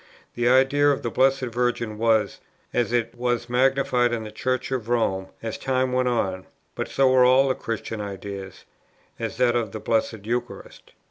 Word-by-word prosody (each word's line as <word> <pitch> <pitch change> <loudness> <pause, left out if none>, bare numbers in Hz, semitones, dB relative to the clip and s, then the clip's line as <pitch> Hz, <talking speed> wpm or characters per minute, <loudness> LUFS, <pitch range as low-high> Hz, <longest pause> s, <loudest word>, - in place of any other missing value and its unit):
The 120 0 +1
idea 135 +3 +4
of 140 - 0
the 120 - -2
Blessed 135 +2 +3
Virgin 120 -2 -1
was 110 -2 +1 0.3
as 120 -1 0
it 115 -1 0
were 120 0 0
magnified 125 -1 +2
in 115 -2 -2
the 105 - -8
Church 130 +4 -2
of 120 -4 -3
Rome, 95 -6 0 0.2
as 110 -1 -4
time 130 -1 0
went 125 0 +1
on, 95 -6 -1 0.3
but - - -4
so 135 -1 +2
were 130 -1 +5
all 130 +2 +5
the - - +3
Christian 115 -2 -5
ideas; 100 -1 -7 0.5
as - - -4
that 120 -1 +3
of 115 -5 -1
the 110 - -5
Blessed 110 -1 -1
Eucharist. 120 +2 -5
120 Hz, 180 wpm, -24 LUFS, 110-130 Hz, 0.5 s, were